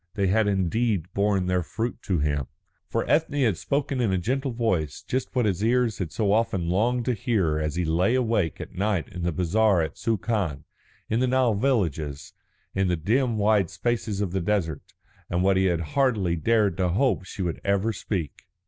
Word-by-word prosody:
They 100 - +1
had 105 +3 +2
indeed 95 -1 0
borne 100 -2 +1
their 90 0 +1
fruit 115 +8 -4
to 95 - +1
him. 70 -3 0 0.4
For - - -1
Ethne 145 -2 +2
had 110 -7 +2
spoken 140 - -1
in 110 -5 +1
a 95 - +1
gentle 130 +9 -1
voice 105 - -1
just 130 +1 -3
what 125 -3 +2
his 100 -1 0
ears 120 -2 +2
had 85 -5 -3
so 105 -3 0
often 100 -6 +1
longed 115 +6 +1
to 125 - +1
hear 105 - 0
as 75 -1 -2
he 90 0 0
lay 90 +9 +2
awake 110 - 0
at - - -8
night 100 -2 -1
in 90 - -7
the 85 0 0
bazaar 95 +4 +2
at 80 - -6
Suakin, 105 - -1 0.4
in 110 - 0
the 130 - +2
Nile 125 -2 +3
villages, 85 - -1 0.4
in 95 0 +1
the 90 - +1
dim 115 - +1
wide 105 -4 +3
spaces 115 -4 -2
of 100 -4 -1
the 95 0 -1
desert, 85 -5 -1 0.5
and 90 +1 0
what 95 0 +3
he 95 0 +3
had 85 -3 +1
hardly 115 -11 +2
dared 105 +1 +2
to 90 -2 +1
hope 120 +3 +1
she 95 +1 -5 0.2
ever 100 0 +1
would - - -1
speak. 90 -7 -4
100 Hz, 195 wpm, -25 LUFS, 90-115 Hz, 0.5 s, Nile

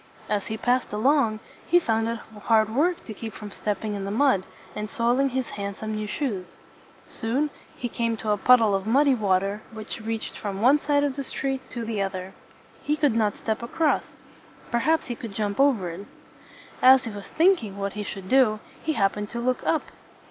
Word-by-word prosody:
As 205 -2 -1
he 220 - -3
passed 250 +3 +1
along, 220 0 +2 0.3
he 350 - +5
found 225 -9 +1
it 230 0 -2 0.3
hard 220 -1 +3
work 340 +5 +2
to 220 - -6
keep 220 +1 -7
from 210 -1 -8
stepping 210 +1 -3
in 200 -1 -4
the 195 - -3
mud, 220 -3 +3 0.3
and 210 0 -4
soiling 245 +5 +2
his 260 -1 -2
hand 200 -1 -4
some 220 +1 -5
new 215 0 -3
shoes. 210 -6 -3 0.5
Soon 270 +7 -1 0.3
he 245 - -3
came 230 -1 -1
to 215 -1 -2
a 210 - +2
puddle 225 -1 +5
of 195 +1 -1
muddy 275 +4 +4
water 200 -2 +1
which 220 0 -7
reached 225 0 -4
from 195 -2 -4
one 260 +7 +5
side 285 -1 +2
of 285 -1 -1
the 275 - -2
street 270 0 -3
to 235 -2 -5
the 220 -3 -2
other. 190 -1 -4 0.5
He 300 +1 0
could 290 -5 +3
not 215 -3 +1
step 220 0 -2
across. 300 +6 0 0.6
Perhaps 310 +8 +2
he 245 - -3
could 225 -4 -8
jump 205 0 -2
over 240 -11 +3
it. 190 +5 -9 0.7
As 260 0 +7
he 225 - -4
was 205 -1 -8
thinking 320 - +2
what 200 0 -3
he 210 - -4
should 195 -2 -6
do, 235 -3 +4 0.2
he 315 - -1
happened 205 -3 0
to 235 - -5
look 255 +1 0
up. 320 - +1
225 Hz, 200 wpm, -25 LUFS, 205-265 Hz, 0.7 s, As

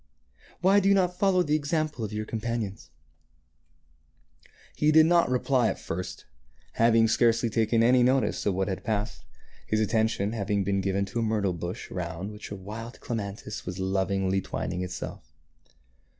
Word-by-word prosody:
Why 195 +2 +5
do 195 0 +2
you 200 - +5
not 180 -2 +1
follow 190 -2 +3
the 150 -2 -1
example 155 -3 -1
of 105 - -4
your 105 0 -3
com 115 - -4
panions? 115 -4 -4 0.9
" - - -31
He 150 0 +3
did 155 0 +7
not 170 -2 +4
reply 125 -1 +2
at - - -1
first, 90 +2 -6 0.5
having 115 0 +4
scarcely 115 +1 +2
taken 115 +1 +2
any 125 +2 +5
notice 125 -4 +2
of 100 - +1
what 95 0 0
had 95 -2 -4
passed, 100 - -3 0.4
his 110 - +1
attention 110 -1 +1
having 100 -2 -1
been 100 0 0
given 100 +1 0
to 100 +5 -4
a - - +1
myrtle 105 -4 0
bush 85 +4 -6
around 90 +2 -4
which 105 0 -9
a 100 - -5
wild 110 +5 -8
clematis 105 -2 -5
was 90 0 -4
lovingly 95 0 0
twining 90 -1 -4
itself. 90 - -7
110 Hz, 165 wpm, -27 LUFS, 95-125 Hz, 0.9 s, did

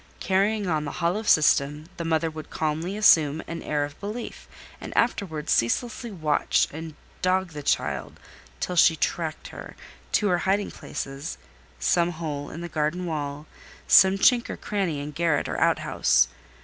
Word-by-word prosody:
Carrying 200 +2 +1
on 155 -4 0
the 145 - -5
hollow 175 +5 0
system, 150 -5 +3
the 170 - -3
mother 165 0 0
would 155 0 -9
calmly 160 +5 -2
assume 160 -7 +4
an 165 0 -6
air 145 -1 -1
of 145 +1 -12
belief, 215 +4 -6 0.3
and - - -7
afterwards 180 -10 0
ceaselessly 235 - 0
watch 155 -7 +1
and 160 0 -8 0.3
dog 185 0 +1
the 150 -1 -7
child 145 - -1 0.4
till 180 - -3
she 165 -1 +6
tracked 160 0 -3
her: - - -10 0.4
to 210 - +3
her 175 -1 +2
hiding 200 +2 0
places—some 160 +4 -3
hole 150 -3 -5
in 170 - -8
the 175 - -5
garden 160 +3 -2
wall—some 155 +5 +1
chink 240 +4 +4
or - - -5
cranny 190 -8 -2
in 145 +1 -5
garret 160 -1 0
or - - -3
out - - +4
house. - - +2
165 Hz, 155 wpm, -25 LUFS, 150-190 Hz, 0.4 s, she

